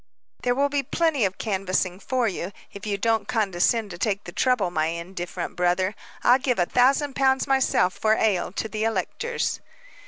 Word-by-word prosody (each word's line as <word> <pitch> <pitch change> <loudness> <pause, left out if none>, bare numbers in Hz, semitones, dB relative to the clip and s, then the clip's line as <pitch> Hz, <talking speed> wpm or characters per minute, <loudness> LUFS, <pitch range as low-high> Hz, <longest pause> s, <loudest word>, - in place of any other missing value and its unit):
"There 245 0 +1
will 280 +2 +2
be 285 0 0
plenty 280 - +1
canvassing 190 -2 -2
for 255 +1 0
you, 185 -2 -3 0.2
if 200 +1 -8
you 200 -1 0
don't 225 +2 +1
condescend 215 -1 +1
to 175 - -8
take 205 0 0
the 175 - -8
trouble, 215 -3 +1
my 155 -2 +1
indifferent 175 +1 -5
brother. 180 +2 +1 0.3
I'll 250 +2 +6
give 255 -2 0
a 175 - +3
thousand 270 - +2
pounds 265 -1 +2
myself, 265 -8 +2
for 220 0 +3
ale, 205 -7 +1
to 220 - -2
the 215 0 -3
electors." 225 - -1
215 Hz, 175 wpm, -25 LUFS, 185-255 Hz, 0.3 s, I'll